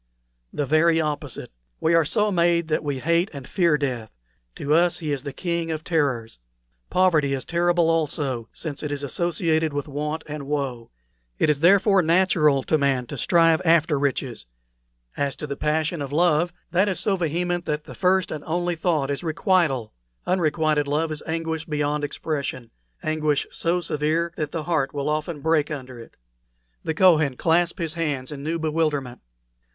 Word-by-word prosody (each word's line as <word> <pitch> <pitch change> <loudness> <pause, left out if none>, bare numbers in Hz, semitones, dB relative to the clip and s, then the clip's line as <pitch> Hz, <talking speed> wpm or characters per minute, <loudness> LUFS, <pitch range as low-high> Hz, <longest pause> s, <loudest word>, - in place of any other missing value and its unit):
"The 145 - -2
very 160 +3 +3
opposite. 150 -2 -4 0.3
We 165 - +2
are 165 -2 +4
so 210 +6 +1
made 170 -2 +2
that 155 - 0
we 145 -2 -2
hate 170 +7 +1
and 135 -3 -8
fear 170 -5 +2
death; 125 -6 -3 0.5
to 145 - -1
us 170 +2 +3
he 155 -3 -4
is 140 - -3
the 140 0 -6
King 170 +3 -2
of 155 -1 -3
Terrors. 135 - -1 0.5
Poverty 160 -7 +3
is 130 - -5
terrible 175 0 +2
also, 145 -7 -1
since 150 -4 -5
it 150 - -4
is 145 0 -3
associated 160 +1 0
with 145 0 -3
want 150 +2 -3
and 150 -2 -6
woe; 135 -5 -3 0.5
it 150 - +3
is, 145 - -1
therefore, 195 +3 +5
natural 165 -5 +3
to 155 - +1
man 135 -3 +1
to - - -7
strive 165 -2 +3
after 160 -3 +3
riches. 130 - -2 0.7
As 140 -1 -1
to - - -6
the 140 -1 -4
passion 155 +2 -1
of 140 -1 -5
love, 170 +1 +2 0.2
that 190 +4 +3
is 190 - -1
so 200 - +1
vehement 175 +1 -1
that 150 0 -2
the - - -10
first 190 0 +1
and 150 -2 -5
only 175 +1 -1
thought 155 -4 0
is 140 - -3
requital. 160 - +1 0.3
Unrequited 155 -4 +1
love 155 +3 0
is 155 - -4
anguish 160 0 -2
beyond 150 -1 -1
expression 140 -5 -4 0.3
anguish 155 -2 0
so 170 +2 0
severe 160 +2 -1
that 150 -1 -3
the 165 -2 -3
heart 150 -4 -1
will 140 +1 -1
often 155 0 -2
break 160 -1 +2
under 130 -5 -7
it." 115 - -13 0.7
The 160 - -2
Kohen 155 -7 +4
clasped 170 +2 +2
his 165 -4 -3
hands 150 -6 -2
in 140 -2 -7
new 160 +3 -2
bewilderment. 155 -5 -1
155 Hz, 175 wpm, -24 LUFS, 145-170 Hz, 0.7 s, therefore